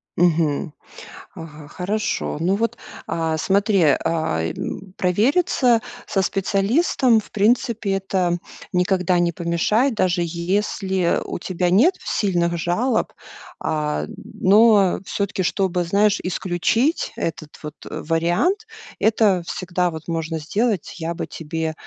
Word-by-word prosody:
Мгм. 165 -2 +1 0.6
Ага. 155 -2 -10
Хорошо. 200 0 -2
Ну 180 +4 +1
вот, 230 +2 -1 0.3
а, 165 -1 -1
смотри, 200 +3 +2
э, 145 -3 +5
м, 160 - -2
провериться 240 - +2 0.3
со 195 - 0
специалистом, 220 - +2
в 215 - -11
принципе, 220 -1 +1
это 190 -2 0 0.3
никогда 180 -1 +1
не 175 0 +2
помешает, 190 - +1
даже 180 -3 +1
если 185 +1 0
у - - -5
тебя 180 0 -1
нет 275 - +5
сильных 175 -4 0
жалоб. 220 +9 0 0.5
А, 150 -1 -1
но 205 -1 +3
всё-таки, 200 -1 -2
чтобы, 180 -1 0
знаешь, 205 +3 +2
исключить 185 - 0
этот 155 -2 -5
вот 150 0 -7
вариант, 175 - 0 0.3
это 205 -3 +3
всегда 180 -1 -1
вот 160 -2 -8
можно 165 -1 -2
сделать. 205 +5 -1
Я 170 0 -3
бы - - -4
тебе 160 0 -4
185 Hz, 115 wpm, -21 LUFS, 170-210 Hz, 0.6 s, э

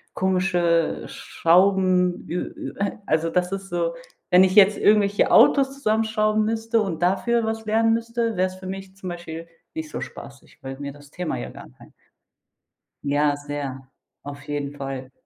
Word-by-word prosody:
komische 180 -3 +1
Schrauben 180 0 +2
ü 180 - -3
ü 310 -2 -7
äh, 200 0 -2
also 160 +1 +1
das 180 +1 0
ist 195 0 -5
so, 170 -1 -1 0.4
wenn 180 +1 +7
ich 185 0 +2
jetzt 205 0 +7
irgendwelche 205 -1 +3
Autos 275 -1 +5
zusammenschrauben 215 -3 +1
müsste 225 0 0
und 175 -5 -4
dafür 225 +6 +1
was 220 0 -3
lernen 225 +1 +3
müsste, 230 -2 -2
wäre 185 - +3
es 185 - -9
für 185 0 -10
mich 190 0 -7
zum 185 -2 -7
Beispiel 165 -1 -7 0.3
nicht 320 -1 -5
so - - -5
spaßig, 135 -1 -11
weil 135 0 -7
mir 140 -1 -6
das 145 -1 -16
Thema 180 - -3
ja - - -6
gar - - -11
kein - - -16 1.1
Ja, 145 0 +2
sehr, 145 -2 -6 0.3
auf 145 0 -9
jeden 145 -1 -4
Fall. 135 -2 -6
185 Hz, 165 wpm, -23 LUFS, 155-215 Hz, 1.1 s, wenn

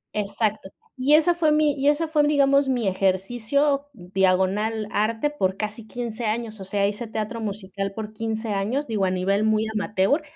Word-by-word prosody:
Exacto. 210 0 -1 0.3
Y 270 +3 +4
esa 320 +3 +4
fue 330 -3 +2
mi 300 -1 +3
y 280 0 -1
esa 310 +3 +1
fue, 310 -1 +2
digamos, 280 -1 +3
mi 245 -6 0
ejercicio/arte 215 +1 0
por 190 -9 -1
casi 215 +1 -5
15 235 -1 -5
años. 220 0 -3
O 190 - -7
sea, 200 +1 0
hice 210 +3 -4
teatro 220 +1 -4
musical 195 -2 -4
por 215 0 -6
15 220 0 -3
años, 215 +9 -1
digo, 210 -4 0
a 185 - +1
nivel 195 +3 +1
muy 220 0 +2
amateur, 210 - +1
220 Hz, 160 wpm, -24 LUFS, 200-275 Hz, 0.3 s, Y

